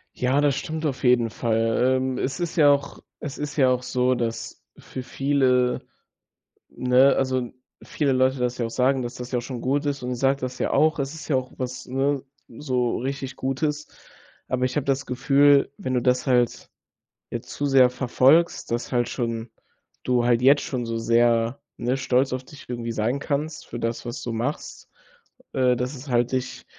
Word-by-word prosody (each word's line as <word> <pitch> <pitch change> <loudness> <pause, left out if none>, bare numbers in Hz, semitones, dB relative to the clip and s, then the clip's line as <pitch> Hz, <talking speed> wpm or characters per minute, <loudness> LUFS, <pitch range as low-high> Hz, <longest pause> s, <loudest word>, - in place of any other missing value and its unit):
Ja, 130 +3 +1
das 145 -2 +2
stimmt 160 +3 -4
auf 135 -4 -2
jeden 120 -3 +3
Fall. 115 +3 +1
Ähm, 130 0 -2
es 135 +1 -2
ist 175 -2 -3
ja 145 -3 +6
auch 140 0 -1 0.2
es 145 -1 -6
ist 150 0 -4
ja 135 -4 +4
auch 125 -1 0
so, 125 0 +1
dass 120 -2 -4 0.2
für 130 - -8
viele 130 -2 +1 0.9
ne, 125 +2 +4
also 130 -2 -1 0.3
viele 145 -3 -1
Leute 130 0 +2
das 125 0 -1
ja 120 - -1
auch 115 - -5
sagen, 130 +2 +1
dass 120 +1 -5
das 125 0 -8
ja 125 - 0
auch - - -1
schon 125 -1 -6
gut 140 +3 0
ist. 145 -1 -2
Und 125 0 -3
ich - - -5
sage 135 +1 +2
das 130 0 -4
ja - - -1
auch. 155 +1 +3
Es 140 0 -3
ist 160 -2 -9
ja 145 - +1
auch 130 -1 -2
was, 125 0 -5
ne, 135 +1 0 0.2
so 125 -1 -1
richtig 135 0 -4
Gutes. 150 +3 -2 0.6
Aber 130 0 0
ich 130 - -3
habe 145 - -1
das 135 -1 0
Gefühl, 140 +2 +4
wenn 130 - -3
du 125 - +1
das 125 +1 +1
halt 125 -3 +1 0.6
jetzt - - -6
zu 145 - -3
sehr 135 -2 +5
verfolgst, 130 +6 +2
dass 120 +1 -3
halt 120 -1 +1
schon 115 -2 -3 0.5
du 125 -1 +1
halt 120 0 +2
jetzt 140 +2 +6
schon 125 -3 -3
so 115 0 -3
sehr, 115 +2 +2 0.2
ne, 125 +2 -1
stolz 130 0 +1
auf 130 0 -3
dich 145 +2 -14
irgendwie 120 -1 -4
sein 115 +4 0
kannst 150 +2 -3
für 120 - -7
das, 115 +1 -3
was 120 0 -5
du 120 - -4
machst, 120 +6 -4 0.6
äh, 125 -1 +3
dass 125 +4 -3
es 135 +2 -10
halt 120 0 +1
dich 130 0 -3
130 Hz, 195 wpm, -24 LUFS, 125-140 Hz, 0.9 s, ja